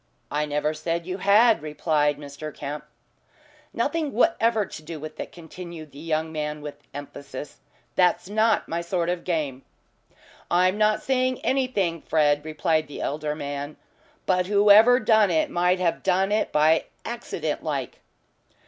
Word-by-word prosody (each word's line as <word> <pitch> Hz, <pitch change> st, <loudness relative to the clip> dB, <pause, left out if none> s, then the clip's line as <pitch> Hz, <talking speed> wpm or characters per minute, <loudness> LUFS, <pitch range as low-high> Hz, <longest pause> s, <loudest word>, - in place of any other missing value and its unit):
"I 150 Hz, +1 st, 0 dB
never 150 Hz, +1 st, 0 dB
said 165 Hz, +2 st, -3 dB
you 185 Hz, +1 st, -4 dB
had," 215 Hz, +4 st, +5 dB
replied 150 Hz, -1 st, 0 dB
Mr. 145 Hz, +1 st, -8 dB
Kemp. 145 Hz, +1 st, -6 dB, 0.9 s
"Nothing 295 Hz, +5 st, -1 dB
whatever 230 Hz, -5 st, +2 dB
to 155 Hz, -, -9 dB
do 155 Hz, 0 st, -7 dB
with 155 Hz, +1 st, -9 dB
it," -, -, -5 dB
continued 170 Hz, -2 st, -10 dB
the 140 Hz, -, -12 dB
young 160 Hz, 0 st, -2 dB
man 150 Hz, -1 st, -4 dB
with 145 Hz, -1 st, -8 dB
emphasis. 140 Hz, -1 st, -8 dB, 0.3 s
"That's 180 Hz, 0 st, +2 dB
not 220 Hz, +2 st, +2 dB
my 170 Hz, +1 st, -2 dB
sort 170 Hz, 0 st, -1 dB
of 175 Hz, -1 st, -2 dB
game." 150 Hz, -7 st, -2 dB, 0.9 s
"I'm 185 Hz, +2 st, +3 dB
not 215 Hz, 0 st, +2 dB
saying 255 Hz, -1 st, +1 dB
anything, 210 Hz, -, 0 dB
Fred," 150 Hz, -2 st, +2 dB
replied 155 Hz, 0 st, 0 dB
the 145 Hz, -, -8 dB
elder 150 Hz, +1 st, -2 dB
man. 145 Hz, 0 st, -5 dB, 0.5 s
"But 180 Hz, -1 st, +1 dB
whoever 210 Hz, +4 st, +6 dB
done 215 Hz, -3 st, +4 dB
it 160 Hz, -2 st, +1 dB
might 180 Hz, +1 st, +2 dB
have 175 Hz, -2 st, 0 dB
done 190 Hz, +2 st, +1 dB
it 215 Hz, +1 st, +1 dB
by 155 Hz, +2 st, +3 dB, 0.2 s
accident 175 Hz, -10 st, -4 dB
like." 140 Hz, -5 st, -3 dB
165 Hz, 150 wpm, -25 LUFS, 150-205 Hz, 0.9 s, whoever